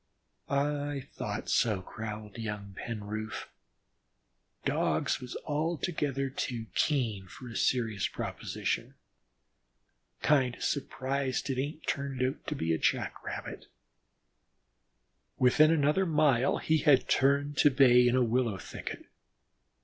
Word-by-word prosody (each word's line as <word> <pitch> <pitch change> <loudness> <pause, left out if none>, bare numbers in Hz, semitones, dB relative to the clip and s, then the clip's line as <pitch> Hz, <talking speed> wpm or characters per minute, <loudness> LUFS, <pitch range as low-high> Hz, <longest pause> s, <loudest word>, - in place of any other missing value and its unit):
"I 145 0 0
thought - - -4
so," 105 -5 +2
growled 105 +1 -7
young 105 -3 -5
Penroof. 110 0 -5 1.2
"Dogs - - +1
was 125 -1 -6
altogether 150 -3 -1
too 120 -4 -3
keen 115 -10 0
for 125 +7 -11
a 115 - -8
serious 110 -6 +1
proposition. - - -3 1.3
Kind 130 -5 +3
o' - - -16
surprised 135 -1 -1
it 130 0 0
ain't 150 +3 -5
turned 140 -2 -2
out 130 +4 -2
a 80 - 0
Jack - - 0
rabbit." - - -6 1.7
Within 140 +5 +5
another 160 +4 +3
mile 140 -5 +3
he 160 0 +1
had 140 -2 +4
turned 140 +2 +2
to 145 - +6
bay 125 -3 +6
in 120 - +3
a 130 - +4
willow 120 -3 +1
thicket. - - -7
130 Hz, 110 wpm, -30 LUFS, 115-145 Hz, 1.7 s, to